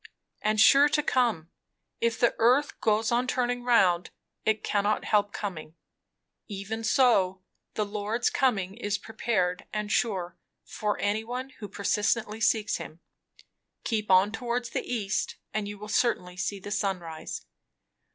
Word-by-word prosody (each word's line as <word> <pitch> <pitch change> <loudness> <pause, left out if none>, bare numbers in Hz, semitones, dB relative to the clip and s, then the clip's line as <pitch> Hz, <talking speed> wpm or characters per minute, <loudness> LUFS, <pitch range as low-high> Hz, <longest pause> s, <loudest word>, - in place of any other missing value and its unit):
"And 215 0 +1
sure 280 +6 +7
to 300 0 +1
come. 230 - +1 0.5
If 230 -1 0
the 240 - +3
earth 255 +6 +3
goes 220 +1 +2
on 245 +2 +1
turning 245 -1 -1
round, 185 -8 +3 0.4
it 220 -1 +1
cannot 205 +1 0
help 205 -1 +2
coming. 170 -7 -6 0.7
Even 210 +2 -5
so: 195 -7 +3 0.3
the 210 - 0
Lord's 210 +3 -1
coming 200 -8 +1
is 205 -2 -2
prepared 200 -6 -1
and 210 -1 -3
sure, 190 -8 0 0.3
for 210 -1 -2
any 210 +2 0
one 250 +3 -5
who 210 - -6
persistently 210 +2 0
seeks 220 -1 +2
him. 160 - -9 0.8
Keep 215 -3 -2
on 190 +2 +5
towards 240 +1 -3
the - - -1
east 215 -3 -1 0.2
and 215 -1 -2
you 205 0 -6
will 210 +1 -9
certainly 210 -5 0
see 200 +2 -3
the 205 +2 -8
sun 195 -2 0
rise." 165 -2 -7
215 Hz, 145 wpm, -28 LUFS, 195-235 Hz, 0.8 s, sure